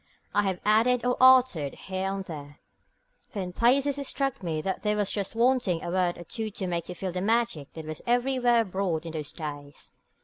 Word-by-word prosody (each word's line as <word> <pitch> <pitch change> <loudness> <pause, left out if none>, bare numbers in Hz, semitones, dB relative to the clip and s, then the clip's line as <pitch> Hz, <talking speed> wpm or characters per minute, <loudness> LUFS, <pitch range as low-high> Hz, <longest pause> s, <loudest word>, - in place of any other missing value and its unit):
I 205 - +4
have 185 -2 -1
added 230 +3 +3
or 250 0 +2
altered 255 - +5
here 190 0 -3
and 195 0 -3
there, 145 -4 -9 0.7
for 205 - -6
in 180 -2 -4
places 275 +6 +3
it 280 - -3
struck 275 -1 -1
me 165 -4 -2
that 190 +4 -3
there 210 0 0
was 205 -2 0
just 200 +1 -2
wanting 235 -7 +2
a 170 - -3
word 180 -1 +1
or 175 - -8
two 220 +5 -4
to 195 -2 -5
make 170 -2 -3
you 180 - -5
feel 185 +1 -4
the 180 +1 -3
magic 220 - 0
that 160 -1 -8
was 155 0 -6
everywhere 245 -1 +3
abroad 185 -5 -2
in 165 - -5
those 155 -2 -5
days. 145 -3 -8
195 Hz, 210 wpm, -27 LUFS, 170-240 Hz, 0.7 s, altered